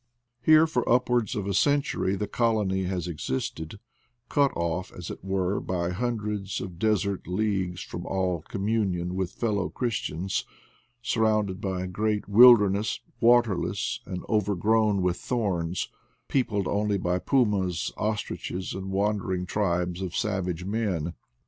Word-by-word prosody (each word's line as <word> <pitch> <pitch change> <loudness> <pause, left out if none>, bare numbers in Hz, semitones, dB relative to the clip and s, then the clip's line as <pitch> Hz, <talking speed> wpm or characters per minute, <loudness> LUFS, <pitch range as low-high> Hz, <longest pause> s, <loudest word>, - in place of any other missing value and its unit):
Here 155 +4 +6
for 125 -7 -1
upwards 125 -3 +2
of 100 - -2
a 100 - -1
century 140 -5 +2
the 105 - -2
colony 105 -5 +1
has 90 -1 -2
existed, 80 +3 -4 0.5
cut 140 -2 +3
off, 85 +2 -2
as 90 - -7
it - - -9
were, 95 0 0
by 90 -1 -2
hundreds 105 -2 -2
of 90 -3 -7
desert 100 -2 0
leagues 95 -2 -1
from 85 - -7
all 90 -3 0
communion 95 -4 -1
with 95 -1 -3
f - - -8
ellow 105 -4 +1
christians, 95 -6 -2 0.6
surrounded 110 -5 +1
by 95 -3 -2
a - - -3
great 105 +3 -1
wil 120 +4 +9
derness, 100 0 0 0.2
waterless 120 -6 +2
and 90 -1 -5
overgrown 105 0 +2
with 90 -1 +1
thorns, 95 -8 -1 0.4
peopled 105 -8 0
only 105 0 +1
by 90 -1 0
pumas, 100 - +1
ostriches, 105 -3 -3
and 95 0 -5
wandering 95 -2 0
tribes 90 -2 -1
of 90 -2 -4
savage 90 -4 -1
men. 95 -6 -1
100 Hz, 135 wpm, -27 LUFS, 90-110 Hz, 0.6 s, wil